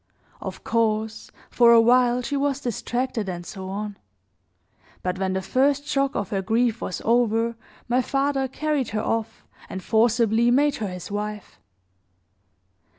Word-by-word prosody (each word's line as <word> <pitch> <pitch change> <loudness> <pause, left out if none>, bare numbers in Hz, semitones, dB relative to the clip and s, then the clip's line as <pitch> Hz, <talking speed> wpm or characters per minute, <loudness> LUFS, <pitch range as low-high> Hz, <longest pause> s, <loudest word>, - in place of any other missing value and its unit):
"Of - - -7
course, 220 -1 -1 0.2
for 235 -1 +6
a 230 - +8
while, 245 +1 +4
she 285 +4 -2
was 280 -1 0
distracted 240 -3 -2
and 175 -1 -5
so 190 +2 -7
on; 205 +1 -5 1.1
but 180 0 -2
when 190 -1 0
the 190 0 -2
first 275 +7 +1
shock 275 -2 0
of 200 -2 -2
her 195 -2 0
grief 230 +3 +1
was 185 - -4
over, 230 0 +2 0.3
my 245 +2 +2
father 275 +1 0
carried 290 -1 -1
her 215 - -1
off, 225 0 -3 0.2
and 190 -1 -6
forcibly 230 +1 +3
made 285 +4 +3
her 215 - -3
his 180 0 -7
wife. 210 0 -5
230 Hz, 150 wpm, -24 LUFS, 210-255 Hz, 1.1 s, a